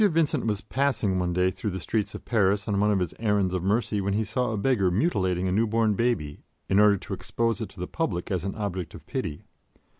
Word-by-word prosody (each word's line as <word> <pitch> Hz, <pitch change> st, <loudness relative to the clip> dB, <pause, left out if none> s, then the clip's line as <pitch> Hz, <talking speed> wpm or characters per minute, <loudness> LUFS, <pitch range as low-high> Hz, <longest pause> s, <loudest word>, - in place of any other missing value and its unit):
VINCENT 165 Hz, -, +2 dB
was 105 Hz, -1 st, 0 dB
passing 115 Hz, -6 st, 0 dB
one 90 Hz, -1 st, 0 dB
day 90 Hz, +1 st, +2 dB
through 105 Hz, -, -4 dB
the 95 Hz, -1 st, -4 dB
streets 105 Hz, +3 st, -2 dB
of -, -, -9 dB
Paris 100 Hz, -3 st, +2 dB
on 100 Hz, -2 st, +1 dB
one 105 Hz, +1 st, +3 dB
of 105 Hz, -, +3 dB
his 90 Hz, -3 st, -1 dB
errands 105 Hz, -4 st, +1 dB
of 90 Hz, -, -1 dB
mercy 105 Hz, +2 st, +1 dB
when 100 Hz, 0 st, -1 dB
he 110 Hz, -, +1 dB
saw 120 Hz, +3 st, -1 dB
a 110 Hz, -, -2 dB
beggar 100 Hz, -3 st, +2 dB
mutilating 95 Hz, -, +1 dB
a -, -, 0 dB
newborn 110 Hz, +1 st, +2 dB
baby 95 Hz, -10 st, -1 dB, 0.3 s
in 95 Hz, -, +3 dB
order 105 Hz, -1 st, +6 dB
to 95 Hz, -, -7 dB
expose 115 Hz, -3 st, -1 dB
it 110 Hz, -, -4 dB
to 100 Hz, -, -15 dB
the 90 Hz, -, -2 dB
public 95 Hz, -, -3 dB
as 90 Hz, -3 st, -1 dB
an 100 Hz, -, -3 dB
object 95 Hz, -5 st, -4 dB
of -, -, -12 dB
pity. 75 Hz, -1 st, -4 dB
100 Hz, 235 wpm, -26 LUFS, 95-115 Hz, 0.3 s, order